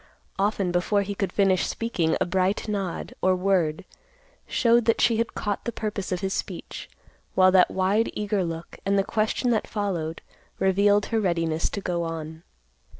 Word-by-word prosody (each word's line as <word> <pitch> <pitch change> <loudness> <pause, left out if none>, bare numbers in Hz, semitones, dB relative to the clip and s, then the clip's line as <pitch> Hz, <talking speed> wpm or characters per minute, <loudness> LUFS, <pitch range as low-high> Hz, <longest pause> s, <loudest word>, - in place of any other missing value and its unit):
Often 195 -2 +1
before 195 +3 +1
he 200 +1 -4
could 195 -2 -2
finish 195 -2 +2
speaking, 175 -9 -1
a - - +2
bright 190 +3 0
nod, 195 -4 -3
or 185 0 +3
word, 180 -4 0 0.6
showed 235 -1 +3
that 230 - +2
she 230 -2 +3
had 230 +1 -1
caught 205 -2 -2
the 235 - -3
purpose 210 -4 -4
of 180 - -1
his 195 -1 -1
speech, - - -5 0.5
while 185 0 +6
that 185 -1 +5
wide 195 +4 +1
eager 210 -2 0
look, 165 -1 -6
and 200 +1 +1
the 195 - +3
question 220 +4 0
that 220 - 0
followed, 175 -7 -3 0.3
revealed 200 +2 +3
her 225 - +3
readiness 165 -4 0
to 200 - -5
go 175 -2 -1
on. 160 -1 -5
195 Hz, 170 wpm, -25 LUFS, 175-210 Hz, 0.6 s, while